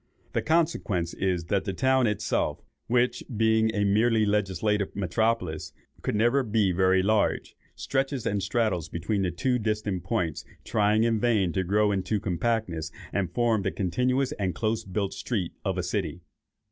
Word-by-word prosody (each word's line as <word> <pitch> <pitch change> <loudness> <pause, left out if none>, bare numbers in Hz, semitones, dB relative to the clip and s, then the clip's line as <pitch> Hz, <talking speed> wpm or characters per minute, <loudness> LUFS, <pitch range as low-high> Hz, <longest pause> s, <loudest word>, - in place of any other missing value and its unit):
The - - +1
consequence 150 - 0
is, 90 -3 -1
that 95 +2 0
the 95 - -2
town 130 +4 +3
itself, 105 0 -1 0.2
which, 125 +1 +1
being 110 0 +3
a 105 - +1
merely 110 +2 +3
legislative 105 0 0
metropolis, 90 -5 -1 0.3
could - - -2
never 120 +6 +3
be 105 -5 +1
very 95 +1 +3
large, 105 +1 +1 0.2
stretches 135 -2 -2
and 100 -1 0
straddles 95 -5 0
between 100 +4 -2
these 90 -3 -1
two 125 +6 +1
distant 105 -4 -2
points, 90 -6 -1 0.2
trying 105 0 +2
in 115 -1 +2
vain 105 -7 +2
to 95 - 0
grow 105 +3 +2
into 100 +2 0
compactness, 90 -4 -1 0.2
and 95 -4 -1
form 115 +1 +2
the 95 - 0
continuous 125 +9 0
and 95 -3 -1
close 110 0 -1
built 95 +1 -2
street 100 -9 -3
of - - -1
a - - -1
city. 90 - -3
105 Hz, 160 wpm, -27 LUFS, 95-115 Hz, 0.3 s, town